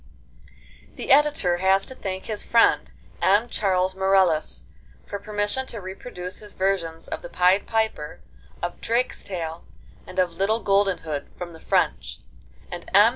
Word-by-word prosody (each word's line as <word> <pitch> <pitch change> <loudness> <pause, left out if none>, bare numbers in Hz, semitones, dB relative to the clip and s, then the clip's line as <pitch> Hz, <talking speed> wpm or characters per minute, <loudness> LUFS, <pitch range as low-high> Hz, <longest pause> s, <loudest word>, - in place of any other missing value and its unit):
The - - -3
Editor 275 -11 +4
has 190 +2 +3
to - - -9
thank 190 -6 -5
his 215 -2 +1
friend, 230 -1 +3 0.3
M. 205 +5 +4
Charles 185 -2 +1
Marelles, 190 -4 +2 0.4
for 200 - -5
permission 210 +5 -2
to 230 - -6
reproduce 185 -1 -7
his 210 -2 -8
versions 175 -4 -1
of - - -5
the 175 - -8
'Pied 180 +3 +3
Piper,' 220 -9 -1 0.4
of 175 - -4
'Drakestail,' 185 -8 -2 0.5
and 185 - -10
of 180 -2 +2
'Little 215 +4 +1
Golden 195 -1 +2
Hood' 150 -3 -5
from 175 -1 -6
the 160 - -12
French, - - 0 0.5
and - - -7
M. - - +8
190 Hz, 145 wpm, -24 LUFS, 180-210 Hz, 0.5 s, M